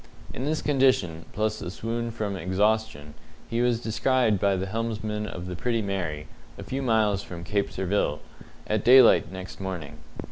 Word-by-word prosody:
In 130 - -4
this 155 +1 -1
condition, 130 - +2
plus 110 0 -1
a - - -4
swoon 115 +4 -3
from 110 -3 -3
exhaustion, 95 -3 0 0.3
he 115 +1 -1
was 120 -2 +2
descried 115 -2 +2
by 100 0 +2
the 95 +1 -2
helmsman 105 0 -3
of 90 -3 -6
the 90 0 -5
Pretty 115 +3 -1
Mary, 85 -7 -3 0.3
a - - -7
few 135 +1 -3
miles 110 -5 +2
from 85 -3 -8
Cape 100 +2 -1
Surville, 95 -5 0 0.5
at 105 -1 -1
daylight 125 -5 +7
next 95 +1 -8
morning. 90 -7 -5
105 Hz, 165 wpm, -26 LUFS, 95-115 Hz, 0.5 s, daylight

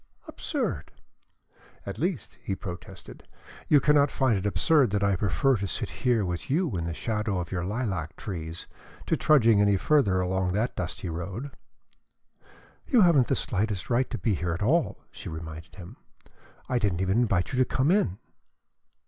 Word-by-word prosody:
"Absurd!" - - -3 0.9
"At - - -6
least," - - -3
he 95 - -3
protested, 90 0 -9 0.4
"you 150 - +6
cannot 145 0 +4
find 130 -5 +1
it 95 +1 -1
absurd 125 - +3
that 100 0 0
I 100 -1 +3
prefer 100 - +2
to 100 0 -3
sit - - -3
here 120 -5 +2
with 90 -1 -4
you 155 - +1
in 85 -2 -2
the 85 - -3
shadow 105 -2 -2
of 85 -2 -4
your 90 -2 -2
lilac 95 - -3
trees, 85 -5 -6 0.4
to - - +1
trudging 115 -8 +4
any 100 -1 +4
further 100 -7 +3
along 90 0 0
that 110 +5 -1
dusty 90 +1 -4
road?" 95 - -5 1.4
"You 245 -5 +4
haven't 165 -9 +5
the - - +1
slightest 105 0 -2
right 125 +2 +2
to 120 - -3
be 105 +2 0
here 85 -2 -1
at 85 - -3
all," 160 +9 +1
she - - -8
reminded 80 +1 -8
him. 90 -3 -11 0.7
"I 125 - +1
didn't 95 -5 0
even 95 +4 +2
invite 100 -3 +1
you 130 - 0
to 130 - +5
come 130 +5 +3
in." 145 - +2
100 Hz, 170 wpm, -27 LUFS, 90-125 Hz, 1.4 s, you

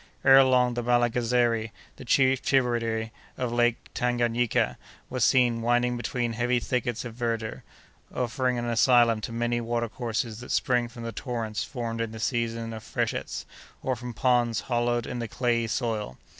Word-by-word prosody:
Ere 135 0 +9
long, 125 -2 +3
the 120 - -2
Malagazeri, 120 -1 +2 0.3
the - - -10
chief 130 +1 +3
tributary 115 -4 0 0.3
of 125 -2 -2
Lake 120 -1 +3 0.2
Tanganayika, 120 -1 +1 0.3
was 130 -2 0
seen 120 -3 +3
winding 120 +1 +2
between 120 -1 -2
heavy 120 +1 +1
thickets 120 -1 -2
of 120 - -6
verdure, 115 -2 -3 0.5
offering 125 0 -1
an 120 - -2
asylum 120 -1 +4
to 115 - -5
many 120 +1 -1
water 115 0 -1
courses 115 -1 -3
that 125 - -10
spring 120 -2 +1
from 120 0 -10
the 115 - -4
torrents 115 -2 -3
formed 115 -3 -4
in 115 -1 -3
the 110 - -7
season 115 -1 -2
of 110 - -7
freshets, - - -3 0.4
or 130 - 0
from 125 +1 -7
ponds 120 -1 +1
hollowed 120 -1 0
in 125 - -5
the 115 - -3
clayey 115 0 0
soil. 110 - -2
120 Hz, 160 wpm, -27 LUFS, 115-125 Hz, 0.5 s, Ere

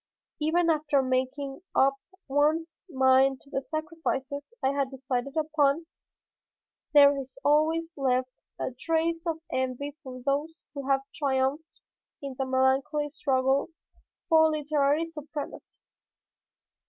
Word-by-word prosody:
Even 330 +2 +2
after 295 -3 +1
making 260 +2 -2 0.2
up 275 +1 +5 0.3
one's 310 +4 +1
mind 265 -1 +4
to 280 - -15
the 270 - -1
sacrifices 285 -1 -4 0.2
I 265 - +4
had 280 -1 0
decided 265 +1 -3
upon, 310 0 +2 1.1
there 285 -1 +7
is 260 -1 -12
always 320 +3 +2
left 255 -2 -1 0.2
a - - -2
trace 330 0 0
of 325 -1 -2
envy 260 +2 -2
for 255 -4 -8
those 295 +4 -2
who 280 -2 -6
have 270 0 +3
triumphed 280 +2 -1 0.4
in 275 -1 -6
the 265 - 0
melancholy 265 +3 +1
struggle 270 -2 +1 0.6
for 320 -1 +6
literary 300 0 +1
supremacy. 305 -2 -8
280 Hz, 115 wpm, -28 LUFS, 265-310 Hz, 1.1 s, there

